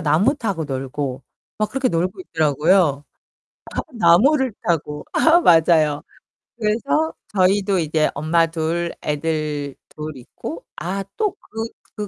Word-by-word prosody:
나무 165 - +3
타고 200 - -2
놀고 135 -1 -4 0.3
막 215 0 -1
그렇게 265 -1 0
놀고 180 - -1
있더라고요. 155 - +2 0.7
다 - - -2
나무를 245 - +4
타고. 150 -3 -1
아 330 +2 +5
맞아요. 160 - +4 0.6
그래서 240 +9 0 0.2
저희도 195 +1 +3
이제 155 -1 +1
엄마 160 +3 +2
둘, 165 +1 -2
애들 150 -2 -2
둘 155 -1 -7
있고 150 +6 -8
아 195 +3 -3
또 425 -2 +1
그 225 +1 -5 0.3
그 210 -1 -4
170 Hz, 235 characters per minute, -21 LUFS, 150-210 Hz, 0.7 s, 아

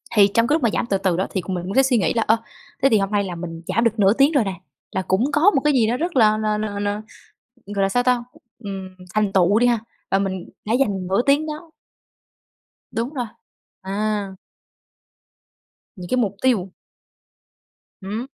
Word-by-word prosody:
thì 200 -1 +7
trong 230 0 +3
cái 305 - +3
lúc 310 - -1
mà 230 - +4
giảm - - 0
từ 200 -4 0
từ 190 -3 0
đó 190 - 0
thì, 190 - -2
ừm, - - -20
cũng 190 - -4
mình 175 - -4
cũng 195 - -4
sẽ 270 - +6
suy 255 -3 +3
nghĩ 200 - +1
là, 230 - +1
ơ, 220 +1 +3 0.5
thế 275 - +6
thì 220 - +4
hôm 195 +1 -1
nay 205 -1 +2
là 180 -3 -5
mình 165 -1 -7
giảm 230 - +1
được 225 -1 +1
nửa 200 +1 +5
tiếng 275 +5 +4
rồi 280 -7 +3
nè, 195 -1 -3 0.4
là 190 - -1
cũng 215 +10 0
có 330 +8 +5
một 270 - +3
cái 300 -1 +3
gì 230 -4 +3
nó 245 +2 0
rất 340 0 -3
là 215 -3 +5
là 215 -1 0
là 205 -1 -3
là, 205 +1 -2 0.7
ừm, 205 - -8
gọi 200 - 0
là 195 - +3
sao 245 +5 +1
ta, 245 -1 +1 0.4
ừm, 195 -1 -5 0.3
thành 210 -2 +1
tựu 195 +3 +4
đi 245 - +3
ha, 240 -2 +3 0.3
và 195 - +3
mình 190 -2 -3 0.2
đã 220 - -1
dành 205 -8 +1
nửa 195 +4 +1
tiếng 290 +3 +3
đó 310 +2 -7 1.2
Đúng 240 +6 -3
rồi, 250 -4 -2 0.6
à. 205 +1 -2 1.7
Những 180 -2 -8
cái 255 - +1
mục 205 -5 0
tiêu. 205 -8 +1 1.3
Ừm. 205 +4 -4
215 Hz, 225 wpm, -22 LUFS, 195-245 Hz, 1.7 s, thì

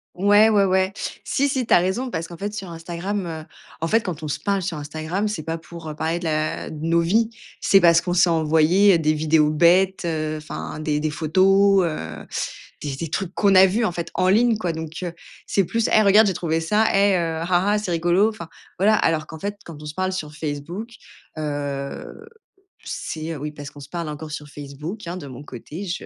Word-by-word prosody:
Ouais, 205 +4 +5
ouais, 205 -2 +4
ouais. 190 +1 +1 0.3
Si, 280 - +1
si, 260 -4 -1
tu - - +3
as - - +8
raison, 190 +9 0
parce 165 -5 -4
qu'en 170 - -10
fait 205 +3 -4
sur 195 -4 -6
Instagram, 175 +4 -4
heu, 160 -1 -6 0.4
en 165 - 0
fait 225 +5 +3
quand 165 -6 -5
on - - -3
se 145 - -3
parle 200 -2 -1
sur 170 -5 -3
Instagram 155 +7 -3
c'est 175 -7 -4
pas 165 0 -3
pour, 165 0 -10
heu, 150 - -6
parler 160 +2 -1
de 175 - -7
la 155 -1 -1
de 155 - -8
nos 170 0 +3
vies. 220 +7 +2 0.3
C'est 195 - +5
parce 170 -2 +5
qu'on 175 -1 -2
s'est 175 0 +5
envoyé, 165 +5 +4
heu, - - +4
des 155 -1 +1
vidéos 155 0 +2
bêtes, 180 +4 +3
heu, 155 -1 -2
enfin, 155 - -6
des 150 -1 -1
des 155 0 -1
photos, 190 +5 +4
heu, 80 - -5 0.6
des 140 -2 -4
des 160 +2 -5
trucs 185 +2 -3
qu'on 200 -2 +3
a 190 0 +8
vu 220 +5 0
en 180 - 0
fait 170 -1 -5
en 185 - +2
ligne 225 +2 +4
quoi, 180 -6 -2
donc, 160 0 -5
heu, 175 -1 -4 0.3
c'est 195 -3 +1
plus: 230 +5 0
«Hey 215 - +6
regarde, 210 +2 +6
j'ai 195 - +1
trouvé 165 -2 -1
ça 210 +7 +2
et 200 -1 +4
heu, 165 -2 -1
ah 180 +3 +2
ah, - - +3
c'est 210 -4 -3
rigolo», 175 +5 +3
enfin 170 -7 -8 0.3
voilà. 215 +3 +5
Alors 155 -4 +1
qu'en 160 - -9
fait 205 +5 -4
quand 160 -3 -10
on - - -9
se 150 - -6
parle 185 +1 -1
sur 155 -5 -5
Facebook, 155 +8 -5 0.5
heu, 145 - -5 0.6
c'est 160 0 -5
oui 150 +1 -5
parce 145 -1 -9
qu'on 145 - -13
se 140 - -11
parle 170 -1 -4
encore 155 +1 -7
sur 150 -1 -6
Facebook, 150 +7 -8
hein, 175 - -4
de 155 - -8
mon 130 +2 -9
côté 150 - -8
je 175 -1 -4
170 Hz, 230 wpm, -22 LUFS, 155-195 Hz, 0.6 s, as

